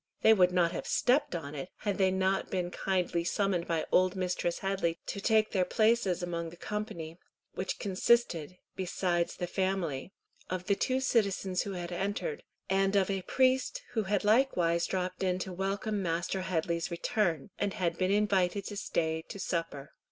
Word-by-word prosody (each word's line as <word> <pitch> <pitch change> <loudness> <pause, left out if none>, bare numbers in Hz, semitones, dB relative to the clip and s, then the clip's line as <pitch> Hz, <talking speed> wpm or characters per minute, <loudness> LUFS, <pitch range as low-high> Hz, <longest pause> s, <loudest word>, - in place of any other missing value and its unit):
They 220 - +8
would 180 -4 +4
not 175 -2 +3
have - - -5
stepped 255 -5 +2
on 150 -4 -5
it, 145 +4 -5
had 205 -2 -1
they 190 -1 +4
not 190 +1 0
been 180 -2 -2
kindly 180 -3 0
summoned 185 -1 0
by 165 -1 0
old 185 0 +4
Mistress 180 -2 -1
Headley 190 -4 -1
to 200 - -4
take 220 0 +3
their 185 -3 +2
places 215 -3 +2
among 170 -1 -3
the 170 - -13
company, 170 -6 -5 0.3
which 190 - -3
consisted, 185 -4 +1 0.2
besides 175 -2 -1
the 180 - -3
family, 185 -5 -2 0.4
of 185 0 -3
the 200 - +3
two 255 +6 0
citizens 200 -7 +1
who 200 - -4
had 175 -1 -5
entered, 205 - -2 0.3
and 195 +1 +2
of 195 -1 +3
a 195 -1 -1
priest 260 +5 +1
who 230 -3 0
had 205 0 0
likewise 195 -7 +3
dropped 185 -1 -2
in 185 -1 +1
to 185 0 -5
welcome 195 +3 -2
Master 175 +2 -1
Headley's 170 -2 -1
return, 170 -1 -1
and 200 -1 -1
had 175 -5 0
been 185 0 +2
invited 200 -2 +2
to 205 - -5
stay 160 -4 -1
to 200 - -7
supper. 165 -6 -3
185 Hz, 175 wpm, -31 LUFS, 175-200 Hz, 0.4 s, They